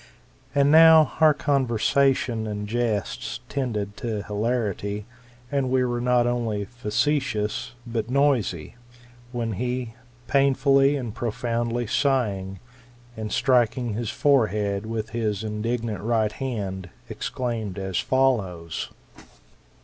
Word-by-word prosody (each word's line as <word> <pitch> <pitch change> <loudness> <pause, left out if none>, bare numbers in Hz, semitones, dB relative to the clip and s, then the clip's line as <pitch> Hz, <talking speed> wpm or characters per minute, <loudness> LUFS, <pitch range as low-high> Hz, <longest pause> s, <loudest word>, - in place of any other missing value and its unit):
And 140 0 +4
now 160 -2 +8
our 155 -1 +7
conversation 130 -3 +1
and 105 -1 -4
jests 115 -2 -2
tended 105 -7 -2
to 110 -4 -3
hilarity, 105 -2 -2 0.5
and 140 -2 0
we 130 0 +2
were 120 -1 -2
not 125 -1 +3
only 115 -4 -1
facetious, 120 0 -1
but 115 -1 -3
noisy; 125 - +1 0.5
when 120 -2 -2
he, 125 -2 -2 0.3
painfully 140 +1 +3
and 120 -6 -4
profoundly 120 +1 -2
sighing, 100 -7 0 0.6
and 110 -1 -5
striking 120 -2 +2
his 115 0 -3
forehead 105 -7 +1
with 110 0 -4
his 110 -3 -2
indignant 110 -1 -3
right 110 -1 +1
hand, 100 -8 -4 0.2
exclaimed 115 -6 -4
as 95 -2 -2
follows. 95 -11 0
115 Hz, 105 wpm, -24 LUFS, 105-130 Hz, 0.6 s, now